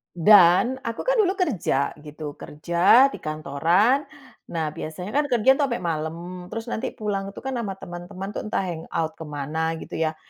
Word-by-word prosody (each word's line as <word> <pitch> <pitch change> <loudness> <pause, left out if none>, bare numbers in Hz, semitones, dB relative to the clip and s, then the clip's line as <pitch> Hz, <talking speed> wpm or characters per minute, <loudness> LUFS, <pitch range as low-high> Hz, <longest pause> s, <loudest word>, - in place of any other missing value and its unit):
Dan 195 +7 +6
aku 230 0 -4
kan - - +2
dulu 390 -2 +3
kerja 220 - 0
gitu, 150 0 -8
kerja 170 - +4
di - - -8
kantoran. 165 - +1 0.4
Nah, 160 -2 -1
biasanya 165 +4 -6
kan 295 +1 +3
kerja 260 +1 +4
tuh 285 - +3
sampai 235 -6 -3
malam, 170 +2 -4
terus 225 +4 -6
nanti 250 +4 -3
pulang 200 -2 -3
tuh - - -8
kan 265 - -3
sama 205 -5 -3
teman-teman 180 +1 -8
itu - - -4
entah 210 - -1
hang 170 -3 -5
out 160 -1 0
ke 160 - -6
mana 155 +3 -2
gitu - - -6
ya? 160 -1 0
180 Hz, 180 wpm, -24 LUFS, 160-230 Hz, 0.4 s, Dan